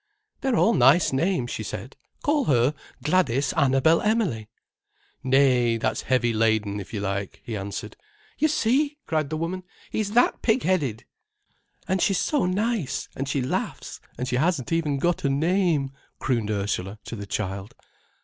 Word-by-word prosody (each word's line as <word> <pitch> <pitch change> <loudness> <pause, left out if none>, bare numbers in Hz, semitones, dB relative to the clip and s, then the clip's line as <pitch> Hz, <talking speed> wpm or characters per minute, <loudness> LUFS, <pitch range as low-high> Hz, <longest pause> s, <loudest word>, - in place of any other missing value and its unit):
"They're 265 -3 0
all 230 - +4
nice 135 +5 +5
names," 135 -4 0
she - - -4
said. 105 +4 -6 0.3
"Call 290 -2 +2
her 130 - +3 0.3
Gladys 145 -4 +2
Annabel 140 +2 +4
Emily." 195 - 0 0.7
"Nay, 130 -3 +3
that's 115 - -1
heavy 120 -3 +1
laden, 110 -2 +1
if 95 - -9
you 105 - -3
like," 100 -1 -3
he 115 - -4
answered. 100 0 -5 0.4
"You 310 - +4
see!" 290 +1 +1
cried 155 -3 -1
the 155 - -2
woman. 170 +3 -3 0.3
"He's 210 -1 -2
that 245 +2 +3
pig 240 +2 +2
headed!" 145 - 0 0.8
"And 190 0 0
she's 200 -3 +2
so 290 -11 +1
nice, 205 - -1
and 135 +1 -3
she 135 -1 0
laughs, 125 - -3 0.2
and 125 +2 -3
she 125 - 0
hasn't 155 -2 0
even 160 -4 +1
got 175 +5 0
a 140 - +2
name," 160 -1 +1 0.3
crooned 115 -5 -1
Ursula 100 -1 -2
to - - -6
the 100 -2 -7
child. 100 +1 -4
135 Hz, 160 wpm, -25 LUFS, 115-185 Hz, 0.8 s, nice